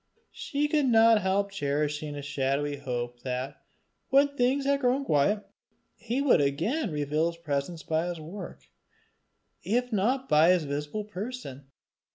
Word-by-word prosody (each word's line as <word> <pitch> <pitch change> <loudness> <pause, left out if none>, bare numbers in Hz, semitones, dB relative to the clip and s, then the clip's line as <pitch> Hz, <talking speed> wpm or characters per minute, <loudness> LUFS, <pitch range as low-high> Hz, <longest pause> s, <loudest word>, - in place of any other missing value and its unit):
She 295 -1 -2
could 295 -2 +2
not 225 -2 +6
help 200 +1 0
cherishing 150 -3 -2
a 145 - -6
shadowy 145 +1 -1
hope 120 -3 -4
that, 130 +2 -4 0.5
when 275 +2 +5
things 275 0 +1
had 280 0 +2
grown 265 +1 +1
quiet, 200 - +1 0.5
he 240 +4 -2
would 270 - +5
again 175 - 0
reveal 150 +1 0
his 170 0 -5
presence 155 +1 -3
by 160 +2 0
his 175 -2 -4
work, 170 +7 -9 0.9
if 245 +3 -1
not 250 +7 +1
by 155 +3 +5
his 180 -3 +1
visible 145 +8 -3
person. 205 - -7
175 Hz, 145 wpm, -28 LUFS, -, 0.9 s, not